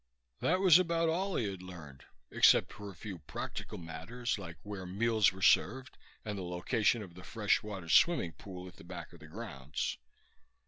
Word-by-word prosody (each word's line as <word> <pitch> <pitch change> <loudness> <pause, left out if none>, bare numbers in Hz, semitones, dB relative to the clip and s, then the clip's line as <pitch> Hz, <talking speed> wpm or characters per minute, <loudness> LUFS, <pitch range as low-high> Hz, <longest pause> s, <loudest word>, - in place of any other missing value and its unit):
That 185 - +2
was 185 -3 +8
about 165 -2 +1
all 185 +4 0
he 110 - 0
had 95 -2 -5
learned, 80 -7 -11 0.3
except - - +5
for 105 -1 -8
a 95 - -11
few 95 +1 -7
practical 75 - -6
matters 95 +9 -4
like 85 -4 -8
where 100 -2 -6
meals 110 +2 +3
were 95 0 -8
served 130 +1 +3 0.3
and 105 -2 -3
the - - -4
location 105 +6 +1
of 90 -4 -11
the 90 +1 -12
fresh 105 +1 +1
water 100 -5 -7
swimming 90 - +4
pool 90 +2 -9
at 90 - -13
the - - -13
back 85 -1 -8
of 85 - -14
the 80 - -12
grounds. 75 - -4
100 Hz, 185 wpm, -33 LUFS, 85-115 Hz, 0.3 s, was